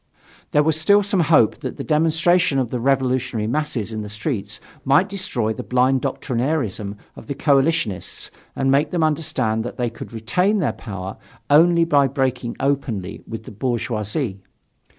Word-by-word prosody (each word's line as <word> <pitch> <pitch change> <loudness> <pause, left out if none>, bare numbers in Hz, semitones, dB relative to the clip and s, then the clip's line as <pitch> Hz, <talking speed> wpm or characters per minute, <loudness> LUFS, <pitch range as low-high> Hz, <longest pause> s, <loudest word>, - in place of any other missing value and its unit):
There 150 - +3
was 160 0 +1
still 205 +5 +5
some 200 -1 0
hope 155 -9 +4
that 130 -4 -6
the - - -4
demonstration 165 +1 +2
of 125 -4 0
the 125 - -2
revolutionary 130 -3 0
masses 120 -4 -2
in 110 - -3
the 105 - -6
streets 105 -2 -3 0.2
might 140 +8 +4
destroy 185 - -1
the - - -6
blind 130 +1 +2
doctrinairism 125 -6 -2 0.2
of - - -12
the 140 - -3
coalitionists 140 - 0 0.2
and 135 0 +1
make 140 +3 +3
them 175 -3 0
understand 145 -8 0
that 120 - -6
they 120 -2 -1
could 115 - -9
retain 180 - +1
their 180 - 0
power 95 -3 -7 0.3
only 170 +3 +6
by 145 -4 +4
breaking 130 -3 -2
openly 125 -9 -2
with 115 -1 -6
the - - -10
bourgeoisie. 110 -1 -2
130 Hz, 160 wpm, -21 LUFS, 115-155 Hz, 0.3 s, only